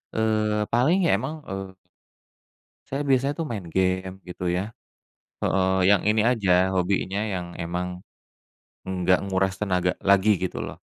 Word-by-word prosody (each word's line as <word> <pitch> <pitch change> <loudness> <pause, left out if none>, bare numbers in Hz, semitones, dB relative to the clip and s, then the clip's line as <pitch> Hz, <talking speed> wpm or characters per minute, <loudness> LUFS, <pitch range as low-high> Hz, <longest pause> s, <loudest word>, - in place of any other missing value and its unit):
eee, 110 -1 +1
paling 155 +11 +3
ya - - +3
emang 155 -1 -5
eee 95 -3 -7 1.1
Saya 135 +2 -2
biasanya 135 +1 +2
tuh 165 - -2
main 100 -6 -4
game, 95 0 0
gitu 90 - -6
ya 90 +1 0 0.8
heeh, 95 0 +2 0.2
yang 100 - +4
ini 110 0 +3
aja, 105 -7 +1 0.2
hobinya 95 +1 0
yang 90 -2 -3 0.2
emang, 90 +2 -3 1.0
nggak 90 -1 +2
menguras 95 -1 0
tenaga 90 -3 +1
lagi 100 +1 +4
gitu 95 - -3
loh. - - -7
95 Hz, 140 wpm, -25 LUFS, 95-110 Hz, 1.1 s, yang